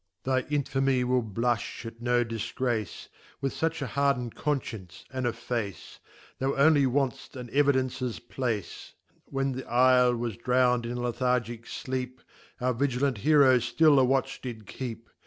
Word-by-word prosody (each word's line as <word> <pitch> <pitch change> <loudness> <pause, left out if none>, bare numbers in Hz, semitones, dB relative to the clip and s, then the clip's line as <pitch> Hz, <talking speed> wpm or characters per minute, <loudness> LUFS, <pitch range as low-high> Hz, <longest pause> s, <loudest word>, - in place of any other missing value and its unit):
Thy 130 0 +2
Infamy 135 -3 +1
will 125 0 +2
blufti 115 +2 -2
at 115 0 -9
no 120 0 +2
difgrace, 115 0 -3 0.3
(With 135 -1 -2
fuch 160 -2 -1
a - - -2
harden 135 -2 0
d - - -19
Confcience, 110 - -4
and 130 -1 -1
a - - +1
Face) 105 -9 -5 0.4
Thou 135 +1 0
only 140 -1 +5
want'ft 135 0 -1
an 125 -2 -8
Evidences 130 -3 +1
place. 120 -4 -4 0.3
When 135 0 -1
trifle 125 -1 +4
was 115 -3 -3
drown'd 125 0 +2
in 120 +1 -4
a - - -3
Lethargick. 120 -1 -1
fleep, 130 -1 -4 0.4
Our 125 0 +1
vigilant 130 -1 0
Heroe 140 -2 +5
ftill 140 +5 +4
a - - +5
watch 130 +1 0
did 115 -4 -7
keep. 115 +1 -7
125 Hz, 150 wpm, -28 LUFS, 120-135 Hz, 0.4 s, only